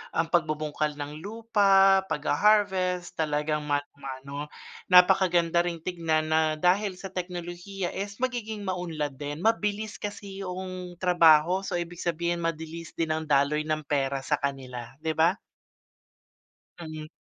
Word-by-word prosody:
ang 165 0 +1
pagbubungkal 155 -2 0
ng 145 +1 -6
lupa, 195 -2 +4
pagha-harvest 185 +2 +1
talagang 150 -1 0
mano-mano. 140 0 -4 0.4
Napakaganda 180 -2 +5
ring 170 -2 -3
tignan 160 -3 0
na 160 - +4 0.2
dahil 190 +2 +3
sa 190 +1 -8
teknolohiya 175 +1 -5
is 200 +1 -5
magiging 225 -4 -2
maunlad 165 -7 -3
din. 145 +2 -5
Mabilis 210 -2 0
kasi 200 -1 -7
'yong 185 -1 -6
trabaho, 175 +1 +5
so - - -4
ibig 175 0 -4
sabihin 170 0 -1
mabilis 165 0 -4
din 165 -1 -1
ang 160 0 -1
daloy 150 +2 +2
ng 155 0 0
pera 140 -1 -1
sa 150 +1 +1
kanila, 130 -3 -5
'di 160 - 0
ba? 170 +5 +3 1.4
Mm. 155 -2 -7
170 Hz, 125 wpm, -27 LUFS, 150-190 Hz, 1.4 s, Napakaganda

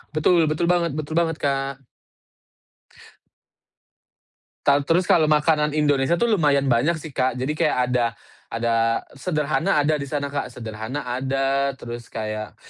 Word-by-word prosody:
Betul, 165 +1 +4
betul 155 +2 0
banget 170 -3 +1
betul 155 +1 -4
banget, 165 -2 0
Kak. 135 -1 -1 2.9
Kal 140 +1 +4
terus, 175 +2 +3
kalau 160 -3 +4
makanan 150 0 +2
Indonesia 145 +1 +2
tuh 235 +3 +1
lumayan 145 -7 +2
banyak 130 +8 +2
sih, 155 0 -9
Kak. 130 -1 0
Jadi 130 +4 -1
kayak - - +1
ada 125 -1 +2 0.4
ada 115 0 0 0.2
Sederhana 155 +3 0
ada 150 +1 +1
di 140 - -5
sana, 140 0 -3
Kak. 145 - -2
Sederhana 110 +4 -6
ada, 135 +2 -1
terus 120 -2 -8
kayak 110 -1 -5
140 Hz, 135 wpm, -23 LUFS, 125-155 Hz, 2.9 s, Betul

